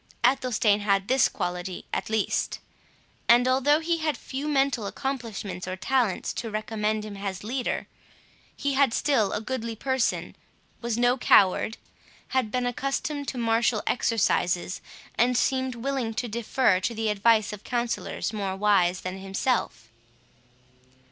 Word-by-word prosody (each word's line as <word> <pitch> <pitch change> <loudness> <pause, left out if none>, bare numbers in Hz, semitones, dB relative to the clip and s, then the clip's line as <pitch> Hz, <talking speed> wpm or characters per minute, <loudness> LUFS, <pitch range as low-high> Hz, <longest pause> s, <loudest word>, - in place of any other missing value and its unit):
Athelstane 240 -5 +3
had 200 -1 +1
this 260 0 +4
quality 180 +1 -4
at - - -2
least; 220 -2 0 0.7
and 240 +1 +7
though 270 +4 +3
he 335 +1 0
had 310 -2 -1
few 275 +3 -5
mental 275 -7 +1
accomplishments 215 -8 -4
or 185 - -3
talents 235 0 0
to 230 - -4
recommend 215 0 -2
him 210 -1 -7
as 195 -1 -4
a - - -10
leader, 250 +3 -2 0.7
he 280 0 -1
had 270 -3 +3
still 250 -9 +2
a - - -1
goodly 230 0 -4
person, 260 +1 -1 0.5
was 235 -1 -2
no 245 +2 +3
coward, 200 0 +4 0.5
had 260 -4 0
been 250 +2 -1
accustomed 275 +3 -2
to 260 - -4
martial 230 -1 +1
exercises, 185 -7 +1 0.4
and 245 +1 +3
seemed 260 -1 +1
willing 240 -2 -2
to 245 - -2
defer 230 -2 +1
to 230 +4 -2
the 220 0 0
advice 215 +1 +3
of 210 - -9
counsellors 240 -2 -2
more 195 -3 -2
wise 195 -3 +2
than 185 +1 -5
himself. 195 - -1
230 Hz, 140 wpm, -26 LUFS, 205-260 Hz, 0.7 s, and